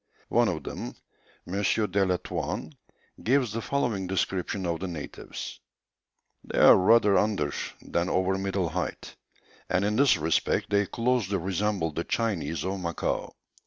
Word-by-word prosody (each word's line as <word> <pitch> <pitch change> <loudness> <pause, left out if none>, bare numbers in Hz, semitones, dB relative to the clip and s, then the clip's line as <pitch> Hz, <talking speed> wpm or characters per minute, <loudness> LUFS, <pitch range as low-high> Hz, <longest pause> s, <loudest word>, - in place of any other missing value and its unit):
One - - +4
of - - -2
them, - - -6 0.5
M. 95 +3 -2
de 100 -2 +2
la 90 -1 +2
Touanne, - - -4 0.5
gives 125 -2 +2
the 115 - -2
following 115 -8 -1
description 95 0 -1
of 85 -1 -1
the 95 - -3
natives: 80 -5 -7 0.8
"They - - -5
are - - +9
rather 105 +1 +5
under 100 -9 0 0.3
than 85 +2 -1
over 95 +1 +1
middle 95 -3 -1
height, 80 -4 -4 0.5
and 95 +2 +2
in 105 +1 0
this 140 -7 +5
respect 80 +5 0
they 100 -1 +3
closely 115 -4 0
resemble 95 -1 -1
the 80 +3 -3
Chinese 85 -10 -1
of 95 +1 -2
Macao. 85 -2 -2
95 Hz, 145 wpm, -27 LUFS, 90-105 Hz, 0.8 s, are